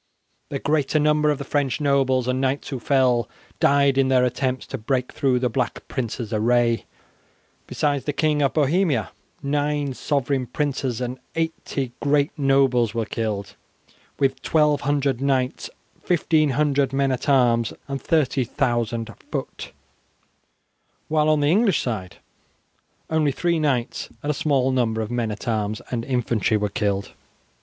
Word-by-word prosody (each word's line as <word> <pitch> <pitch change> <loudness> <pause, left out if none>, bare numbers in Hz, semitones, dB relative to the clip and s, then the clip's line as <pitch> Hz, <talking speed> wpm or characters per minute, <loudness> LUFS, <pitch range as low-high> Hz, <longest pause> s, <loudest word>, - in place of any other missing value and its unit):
The - - -2
greater 150 0 +1
number 150 0 +3
of 150 - +1
the 140 - -5
French 140 -1 -1
nobles 135 -3 +2
and 130 +1 0
knights 135 +1 -1
who 135 - -4
fell, 125 -3 +2 0.3
died 140 -1 +4
in 135 - +3
their 130 -1 +4
attempts 130 +1 -1
to 135 - -6
break 125 +3 -1
through 135 -4 +1
the 125 0 +1
Black 125 +1 -3
Prince's 120 -3 -4
array. 115 +1 +2 0.8
Besides 145 -2 -1
the 145 - 0
King 150 0 +1
of 140 - +1
Bohemia, 155 +2 +1 0.3
nine 145 0 0
sovereign 135 -1 -1
princes 130 -2 -2
and 125 +1 -4 0.2
eighty 160 -5 -2
great 145 +1 +2
nobles 135 -6 +2
were 115 -1 0
killed, 105 -2 -3 0.6
with 135 -1 0
1200 145 -3 +1
knights, 130 -2 0 0.4
1500 150 -5 +2
men 135 0 +1
at 130 +2 -2
arms, 120 -4 +3 0.2
and 140 -1 -4
30,000 120 -6 0 0.2
foot; - - -5 1.4
while 155 0 +2
on 155 -1 +3
the 145 +1 +3
English 200 -2 +3
side 95 -8 -4 1.0
only 155 -2 +2
three 170 +3 0
knights 135 -6 -1
and 145 - 0
a - - -1
small 140 -3 +1
number 115 -4 0
of 110 +1 -4
men 120 -2 -1
at 105 +4 -7
arms 110 -2 -1
and 120 -2 -2
infantry 120 -4 +1
were 105 0 -1
killed. 100 0 -1
135 Hz, 145 wpm, -23 LUFS, 120-145 Hz, 1.4 s, died